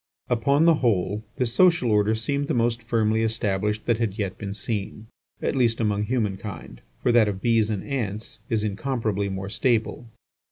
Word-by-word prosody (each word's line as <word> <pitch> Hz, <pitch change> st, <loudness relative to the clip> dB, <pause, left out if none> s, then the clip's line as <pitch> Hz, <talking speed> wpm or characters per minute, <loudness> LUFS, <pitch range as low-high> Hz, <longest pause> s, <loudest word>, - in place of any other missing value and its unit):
Upon 140 Hz, +6 st, +3 dB
the 170 Hz, -, +7 dB
whole, 105 Hz, -3 st, +1 dB
this 120 Hz, -2 st, -1 dB
social 170 Hz, -6 st, +4 dB
order 105 Hz, +1 st, +3 dB
seemed 140 Hz, +6 st, -1 dB
the 155 Hz, -, 0 dB
most 115 Hz, 0 st, +1 dB
firmly 110 Hz, -1 st, +1 dB
established 105 Hz, -1 st, -1 dB
that 120 Hz, -2 st, +1 dB
had 110 Hz, -3 st, -1 dB
yet 100 Hz, -4 st, -2 dB
been 100 Hz, -2 st, -6 dB
seen, 105 Hz, 0 st, -4 dB, 0.4 s
at -, -, 0 dB
least 120 Hz, -3 st, +2 dB
among 105 Hz, -2 st, 0 dB, 0.3 s
kind, 100 Hz, -, -9 dB, 0.2 s
for 120 Hz, -, +3 dB
that 120 Hz, -2 st, +5 dB
of 100 Hz, -2 st, -3 dB
bees 115 Hz, -1 st, +2 dB
and 105 Hz, -3 st, -2 dB
ants 115 Hz, -6 st, -4 dB
is 110 Hz, -2 st, +1 dB
incomparably 110 Hz, -2 st, -1 dB
more 95 Hz, 0 st, -4 dB
stable. 115 Hz, +1 st, 0 dB
110 Hz, 170 wpm, -24 LUFS, 105-120 Hz, 0.4 s, the